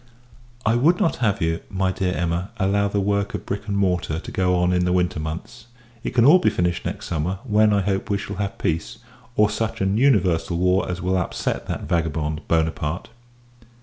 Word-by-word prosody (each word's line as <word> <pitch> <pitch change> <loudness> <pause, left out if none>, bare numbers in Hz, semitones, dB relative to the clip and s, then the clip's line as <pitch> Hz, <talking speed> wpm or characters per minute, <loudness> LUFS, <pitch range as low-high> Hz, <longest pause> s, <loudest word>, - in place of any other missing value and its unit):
I 110 - +3
would 165 +8 +3
not 165 - +1
have 100 -6 0
you, 80 0 0
my 95 -1 0
dear 90 -1 -1
Emma, 85 +2 -1
allow 100 +1 +2
the 100 0 -1
work 100 0 0
of - - -6
brick 100 +2 -4
and 100 -1 -1
mortar 90 -5 0
to - - -9
go 90 -1 +1
on 90 0 +2
in 90 0 +2
the 90 - +1
winter 90 -3 +1
months. 80 +10 -6 0.4
It - - -4
can 120 -1 +5
all 165 +7 +8
be - - +3
finished 90 -1 -1
next - - -5
summer; 90 +3 -2
when, 110 -3 +3
I 100 -1 +3
hope, 95 0 -1
we 100 - +1
shall 100 -1 -6
have 100 -1 -3
peace, 80 0 -2 0.4
or 105 - +5
such 110 +2 -3
an 95 +2 +1
universal 90 -10 +2
war 90 +2 +2
as 90 0 -4
will 95 +1 +1
upset 90 - -2
that - - -3
vagabond, 80 -2 -1
Buonaparte. 80 0 -1
95 Hz, 205 wpm, -23 LUFS, 85-100 Hz, 0.4 s, all